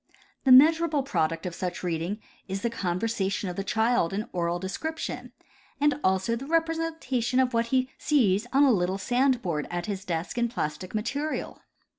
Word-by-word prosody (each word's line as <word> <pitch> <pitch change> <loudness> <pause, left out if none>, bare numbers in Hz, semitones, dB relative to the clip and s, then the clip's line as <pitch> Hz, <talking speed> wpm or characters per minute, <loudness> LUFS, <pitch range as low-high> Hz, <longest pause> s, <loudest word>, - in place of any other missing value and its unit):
The 265 - +5
measurable 310 +2 +6
product 165 - -1
of 180 - -3
such 180 +1 -4
reading 175 +4 -2 0.3
is 195 0 -4
the 235 - 0
con 185 -6 -2
versation 200 -4 -1
of - - -8
the 195 - -3
child 220 -2 +1
in 210 +3 -2
oral 170 -1 0
description, 315 - -5 0.5
and 295 0 +2
also 190 +4 +2
the 250 +4 -6
repre 325 +1 +2
sentation 265 -7 -1
of 255 -1 +2
what 230 0 +1
he 255 +1 +1
sees 230 -7 +2
on 275 +2 +5
a 275 - +6
little 185 -2 +1
sand 245 +4 +1
board 155 -5 -2
at 175 0 -3
his 195 -2 -4
desk 175 +4 -3
in 235 0 +1
plastic 180 -3 -4
material. 285 +8 -3
225 Hz, 180 wpm, -27 LUFS, 185-265 Hz, 0.5 s, measurable